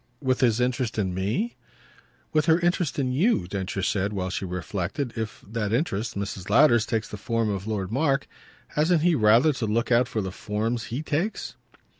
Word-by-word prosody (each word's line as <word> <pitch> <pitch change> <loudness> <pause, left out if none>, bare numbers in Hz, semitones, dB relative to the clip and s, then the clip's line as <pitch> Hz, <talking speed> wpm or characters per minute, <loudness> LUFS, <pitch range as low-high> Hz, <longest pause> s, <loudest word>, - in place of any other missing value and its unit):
"With 130 -2 0
his 120 -3 +3
interest 125 -2 0
in 95 -4 0
me?" 105 - -1 0.8
"With 155 -1 +2
her 160 - +6
own 175 - -2
interest 175 -3 0
in 130 -3 0
you," 140 - +2
Densher 95 0 -3
said 100 +2 0
while 95 -2 -2
she 95 - -3
reflected. 95 - -3
"If 110 -2 -5
that 105 -1 -2
interest 115 - -1
Mrs. 100 -1 -4
Lowder's 120 -1 +5
takes 110 -1 -1
the 105 - -7
form 115 0 -1
of 100 +1 -4
Lord 100 -3 -2
Mark, 135 +2 +1 0.4
hasn't 160 +1 +2
he 175 0 +4
rather 120 +4 +5
to 125 -4 -3
look 115 +4 0
out 120 +1 +4
for 110 - -2
the 95 -1 -4
forms 110 +3 -2
HE 125 +8 -4
takes?" 160 +8 -2
115 Hz, 190 wpm, -26 LUFS, 100-140 Hz, 0.8 s, her